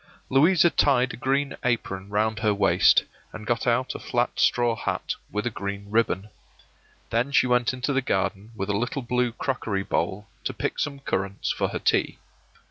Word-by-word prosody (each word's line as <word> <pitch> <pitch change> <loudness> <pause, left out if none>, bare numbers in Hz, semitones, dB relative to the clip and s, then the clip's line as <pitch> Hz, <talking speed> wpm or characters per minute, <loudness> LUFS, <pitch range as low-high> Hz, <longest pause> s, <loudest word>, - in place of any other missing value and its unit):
Louisa 165 +5 +5
tied 130 -3 +3
a - - -5
green 140 +3 0
apron 100 -5 -1
round 105 +1 0
her 105 -2 +2
waist, 100 - +4 0.3
and 110 -1 -9
got 120 +2 -1
out 120 +2 +1
a - - -7
flat 120 0 0
straw 120 -2 +3
hat 90 -5 -2 0.2
with 105 +2 -3
a 120 - 0
green 100 +1 -6
ribbon. 105 -2 0 0.8
Then 120 +4 +1
she 140 - +4
went 125 -2 +2
into 130 +2 -2
the 135 - +2
garden 100 -2 -2
with 100 -1 -4
a - - 0
little 125 +6 -2
blue 125 0 0
crockery 115 -5 -2
bowl, 100 +1 -2 0.2
to - - -2
pick - - -3
some 140 -1 -2
currants 100 -5 -2
for - - 0
her - - -4
tea. - - +1
115 Hz, 180 wpm, -25 LUFS, 100-130 Hz, 0.8 s, Louisa